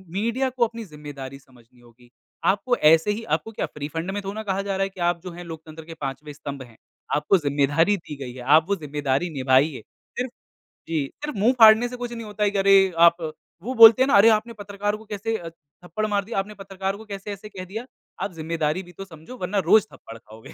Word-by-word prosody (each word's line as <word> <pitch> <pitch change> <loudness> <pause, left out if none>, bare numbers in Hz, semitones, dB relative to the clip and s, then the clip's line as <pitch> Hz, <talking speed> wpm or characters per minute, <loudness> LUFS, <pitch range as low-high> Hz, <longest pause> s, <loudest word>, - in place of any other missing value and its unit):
Media 235 +6 0
को 250 -1 +1
अपनी 230 0 -8
ज़िम्मेदारी 145 -4 -9
समझनी 125 -2 -23
होगी, 120 0 -21 0.4
आपको 205 +6 +2 0.2
ऐसे 165 +5 +4
ही 225 +2 -4
आपको 225 - -7
क्या 220 - -3
फ़्री 145 -1 -7
फ़ंड 165 +4 -3
में 205 +1 -3
थोरो 195 +1 -5
ना 220 0 -5
कहा 195 -1 -1
जा 195 -1 -3
रहा 195 - +1
है 195 - -2
कि 190 -1 -16
आप 170 -1 -3
जो 180 - -7
है 175 +1 -9
लोकतंत्र 160 -1 -10
के 165 - -9
5वें 140 +2 -5
स्तंभ 140 -2 -7
हैं 120 -3 -18 0.4
आपको 150 +6 +3
ज़िम्मेदारी 145 +5 +2
दी 155 -3 -9
गई 130 -3 -7
है, 130 - -9
आप 150 +5 +5
वो 200 - +2
ज़िम्मेदारी 145 -1 -2
निभाइए 130 +2 +2 0.4
सिर्फ़ 250 -1 -2 0.6
जी। 155 -4 0
सिर्फ़ 295 -5 -6
मुँह 230 +6 +4
फाड़ने 220 +2 +8
से 250 - -7
कुछ 240 - -4
नहीं 230 -1 -7
होता 210 0 -3
है 205 - +2
करें 195 -1 +4 0.2
आप 170 - +3 0.5
वो 255 +4 -3
बोलते 225 +2 +10
हैं 270 - +1
ना - - +3
अरे 210 +3 +7
आपने 235 +2 -12
पत्रकार 205 +1 -3
को 220 - -15
कैसे 220 +1 -3
अ, 165 -1 -8
थप्पड़ 165 +6 -7
मार 205 -2 0
दिया, 220 -1 -2
आपने 200 +2 -4
पत्रकार 195 0 -4
को 220 - -12
कैसे 195 +1 -7
ऐसे 205 +1 -8
कह 185 -2 -8
दिया। 230 +3 -5 0.4
आप 200 - -3
ज़िम्मेदारी 160 +2 -2
भी 175 - -15
तो 195 - -8
समझो, 170 +8 -12
वरना 185 +1 -3
रोज़ 215 0 +6
थप्पड़ 115 - -12
खाओगे। 110 0 -14
190 Hz, 230 wpm, -24 LUFS, 150-210 Hz, 0.6 s, बोलते